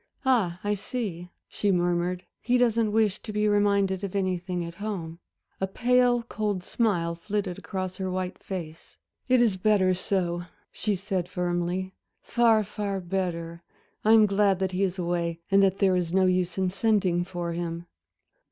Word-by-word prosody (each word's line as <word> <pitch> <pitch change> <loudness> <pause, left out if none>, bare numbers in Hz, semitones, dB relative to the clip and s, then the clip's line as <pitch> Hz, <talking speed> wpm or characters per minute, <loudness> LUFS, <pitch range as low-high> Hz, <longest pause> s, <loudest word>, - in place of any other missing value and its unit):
"Ah, 205 -10 +2
I 205 0 +1
see," 195 -5 -4 0.2
she 205 - 0
murmured, 175 0 0 0.2
"he 245 +1 +2
doesn't 230 -3 +2
wish 215 -2 +2
to 220 - -6
be 210 0 +1
reminded 200 -2 +2
of 200 -1 -4
anything 180 -2 -1
at 170 - -7
home." 170 -6 -4 0.4
A 190 - 0
pale 245 +3 +3
cold 210 -5 -2
smile 180 -7 0
flitted 195 +1 -3
across 185 -1 -4
her 190 -1 -2
white 185 0 -3
face. 165 -4 -7 0.3
"It 255 -1 +5
is 210 -5 +2
better 190 -1 +3
so," 175 -2 -1 0.3
she 210 -2 -1
said, 185 -2 -3
firmly, 180 +1 -2 0.3
"far, 230 -2 +3
far 200 -1 -3
better. 170 -2 -3 0.4
I 220 - +5
am 220 -1 +7
glad 200 -1 +3
that 190 0 -1
he 185 +1 -2
is 190 -1 0
away 170 -1 -1
and 195 0 +6
that 195 -1 +3
there 190 -2 +3
is 175 -2 -1
no 190 +1 +3
use 185 -1 +1
in 190 -1 +1
sending 195 -3 +2
for 175 -1 -4
him." 170 0 -4
190 Hz, 165 wpm, -27 LUFS, 175-210 Hz, 0.4 s, am